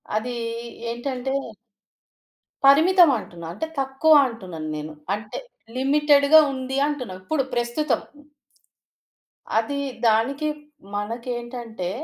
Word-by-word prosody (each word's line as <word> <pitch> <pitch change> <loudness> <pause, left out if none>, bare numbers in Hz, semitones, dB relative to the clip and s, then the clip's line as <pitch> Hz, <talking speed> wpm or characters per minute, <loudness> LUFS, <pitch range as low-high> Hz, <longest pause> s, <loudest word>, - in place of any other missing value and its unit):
అదీ 240 +3 -2 0.6
ఏంటంటే... 255 +2 -3 1.3
పరిమితమంటున్న. 280 - +5
అంటే 320 - -4
తక్కువంటున్నాను 260 - +2
నేను 155 +1 -6 0.2
అంటే 210 0 -8 0.4
లిమిటెడ్‌గా 290 +2 +5
ఉంది 260 0 -4
అంటున్న 275 -9 -4
ఇప్పుడు, 275 +7 0
ప్రస్తుతం. 240 +6 0 1.6
అది 280 +5 -2 0.3
దానికి 260 +7 +2 0.5
మనకేంటంటే 235 -2 -4
255 Hz, 75 wpm, -23 LUFS, 225-280 Hz, 1.6 s, పరిమితమంటున్న